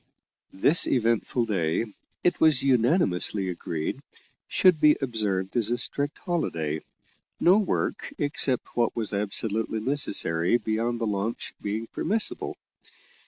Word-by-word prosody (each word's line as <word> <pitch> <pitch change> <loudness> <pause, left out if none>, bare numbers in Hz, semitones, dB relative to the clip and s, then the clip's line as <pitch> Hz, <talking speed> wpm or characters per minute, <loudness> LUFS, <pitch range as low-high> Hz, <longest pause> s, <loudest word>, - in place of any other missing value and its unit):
This 145 - +4
eventful 115 0 0
day, 90 -2 -1 0.4
it 175 - 0
was 155 -5 +4
unanimously 115 - +2
agreed, 85 -3 -4 0.5
should 180 -4 +3
be 150 -1 +5
observed 105 -7 -1
as 115 -3 +3
a 120 - 0
strict 145 +4 -1
holiday, 80 - -3 0.6
no 185 +4 +5
work 205 - -2
except 140 -3 0
what 120 -2 0
was 110 -3 -2
absolutely 105 +2 +1
necessary 105 - +2
beyond 115 +1 -2
the 115 - -1
launch 105 +2 -3
being 105 +2 -3
permissible. 210 - -1
115 Hz, 120 wpm, -25 LUFS, 100-140 Hz, 0.6 s, be